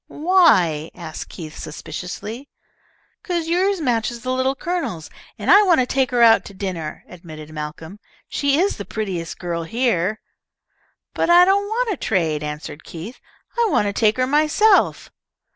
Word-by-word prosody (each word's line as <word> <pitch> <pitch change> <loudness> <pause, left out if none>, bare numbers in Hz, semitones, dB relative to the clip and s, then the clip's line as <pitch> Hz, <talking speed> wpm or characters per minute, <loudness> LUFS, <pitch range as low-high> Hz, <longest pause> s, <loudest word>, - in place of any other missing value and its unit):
"Why?" 240 - +3
asked 165 -3 -8
Keith, 155 -3 -9
suspiciously. 210 - -7 0.7
"'Cause 350 -6 -2
yours 370 +3 +1
matches 235 -4 -1
the 255 - -2
Little 260 +1 0
Colonel's, 305 - -4 0.3
and - - +1
I 405 - +9
want 360 -7 +4
to 255 - +3
take 260 0 0
her 245 -2 +3
out 225 -1 +6
to 200 - -11
dinner," 180 -6 -5
admitted 155 -3 -11
Malcolm. 155 +5 -7 0.3
"She 280 0 0
is 390 +3 +1
the 205 - -5
prettiest 185 -5 -4
girl 170 -2 -3
here." 215 0 0 0.9
"But - - 0
I 350 +1 +8
don't 400 +2 +2
want 455 +2 -1
to 375 - -3
trade," 165 - 0
answered 150 0 -6
Keith. 180 +9 -9 0.4
"I 470 -1 +2
want 210 - +2
to 200 - -1
take 215 +1 +2
her 255 - +2
myself." 310 +9 +3
225 Hz, 160 wpm, -21 LUFS, -, 0.9 s, I